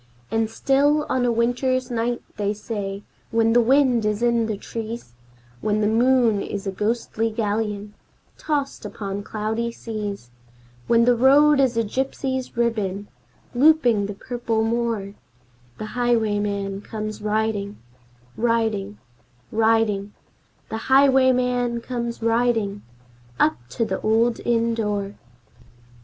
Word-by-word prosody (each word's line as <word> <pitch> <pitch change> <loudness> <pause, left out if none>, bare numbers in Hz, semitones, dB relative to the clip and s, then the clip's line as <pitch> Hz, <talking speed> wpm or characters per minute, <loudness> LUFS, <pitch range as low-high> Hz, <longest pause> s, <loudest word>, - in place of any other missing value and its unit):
And 225 -1 +1
still 285 +5 +2
on 255 -1 +1
a 240 - +2
winter's 245 +2 0
night, 240 +1 -1
they 205 0 -1
say, 205 -2 -5 0.3
when 225 0 +2
the 240 - +6
wind 255 -1 +3
is 210 +2 -1
in 235 -2 +2
the 215 -2 -3
trees, 225 - -7 0.5
When 210 - 0
the - - +2
moon 230 -1 +3
is 200 0 -5
a 195 - -1
ghostly 225 +2 -1
galleon 210 -1 -2 0.4
tossed 285 -3 -2
upon 200 -1 -5
cloudy 220 +3 -3
seas, 210 - -6 0.6
When 230 0 +4
the 245 0 +4
road 280 +4 +5
is 255 -4 +2
a 230 - +3
gypsy's 260 +2 -3
ribbon 205 -4 -1 0.4
looping 245 -7 +4
the 205 - -6
purple 230 0 -2
moor, 225 -3 -1 0.6
The - - -5
highwayman 205 -5 0
comes 215 0 -6
riding 210 -1 -1 0.6
Riding 220 -3 0 0.5
riding 220 -2 +1 0.6
The 220 - -3
highwayman 255 -3 +3
comes 235 -1 -4
riding, 225 -3 +1 0.6
up 155 - +4
to 225 - -1
the - - -3
old 230 +2 +2
inn 230 -1 +1
door. 205 -3 -2
225 Hz, 120 wpm, -23 LUFS, 210-245 Hz, 0.6 s, the